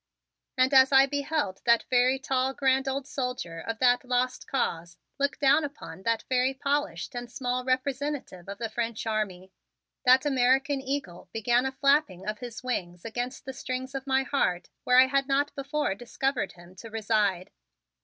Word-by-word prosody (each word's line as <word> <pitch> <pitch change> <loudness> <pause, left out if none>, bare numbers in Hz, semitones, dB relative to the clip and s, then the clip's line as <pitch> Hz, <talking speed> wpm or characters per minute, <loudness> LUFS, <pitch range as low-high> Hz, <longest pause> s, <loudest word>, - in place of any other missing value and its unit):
And 255 +2 +3
as 265 0 +7
I 270 0 +7
beheld 285 -8 -2
that 235 -1 +4
very 255 +1 +4
tall 265 -1 -1
grand 265 0 +2
old 270 0 -2
soldier 250 - -4
of 225 +6 -4
that 245 +1 +3
Lost 250 0 -1
Cause 170 -10 -2 0.2
look 280 0 0
down 285 +2 +4
upon 285 -8 -8
that 230 +2 0
very 255 +1 +1
polished 280 - -2
and 245 -1 -6
small 250 0 -2
representative 260 - -2
of 200 - -6
the 230 +1 -3
French 230 0 -3
army, 195 -4 -3 0.5
that 255 +1 +5
American 270 +1 +2
eagle 260 -11 -5
began 240 +3 +1
a - - -3
flapping 270 - +1
of 215 0 -3
his 245 -1 -8
wings 175 -9 -4
against 245 +4 -4
the 265 - -5
strings 260 +1 -5
of 270 0 -5
my 265 0 +2
heart 180 -10 -1
where 250 - +4
I 260 - +9
had 275 +1 0
not 285 +1 +1
before 280 -3 -1
discovered 245 +5 -2
him 175 +1 -16
to 225 +4 -9
reside. 210 -4 0
255 Hz, 170 wpm, -27 LUFS, 225-270 Hz, 0.5 s, I